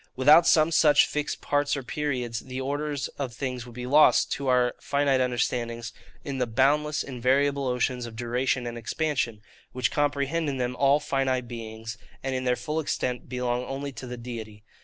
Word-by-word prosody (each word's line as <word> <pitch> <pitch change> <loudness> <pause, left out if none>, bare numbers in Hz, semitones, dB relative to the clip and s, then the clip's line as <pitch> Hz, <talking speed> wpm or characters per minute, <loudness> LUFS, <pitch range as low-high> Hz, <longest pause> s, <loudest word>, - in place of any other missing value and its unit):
Without 150 +6 +6
some 155 +1 +5
such 150 -2 +5
fixed 150 -1 -3
parts 145 0 +1
or 135 - -5
periods, 125 -4 -2
the 130 +1 -7
order 145 +2 -2 0.2
of 135 -3 -2
things 125 -2 -4
would 120 - -12
be 125 0 -5
lost, 145 +4 +5
to 140 -2 -2
our 125 -1 +3
finite 140 -2 +1
understandings, 120 -2 -1 0.3
in 135 -2 -4
the 125 - +1
boundless 145 +5 +2
invariable 135 +2 +1
oceans 125 0 -1
of 115 - -10
duration 125 +2 -1
and 120 0 -5
expansion, 120 -4 -2 0.3
which 125 -3 0
comprehend 145 +2 0
in 135 - -3
them 125 0 -2
all 140 +2 +4
finite 130 -3 -1
beings, 115 -1 -7 0.2
and 135 0 -2
in 130 0 -2
their 125 0 +2
full 150 +5 -3
extent 125 -5 -2
belong 125 -1 -1
only 140 +2 -4
to 125 0 -8
the 125 0 -6
Deity. 110 -3 -8
130 Hz, 180 wpm, -26 LUFS, 120-145 Hz, 0.3 s, Without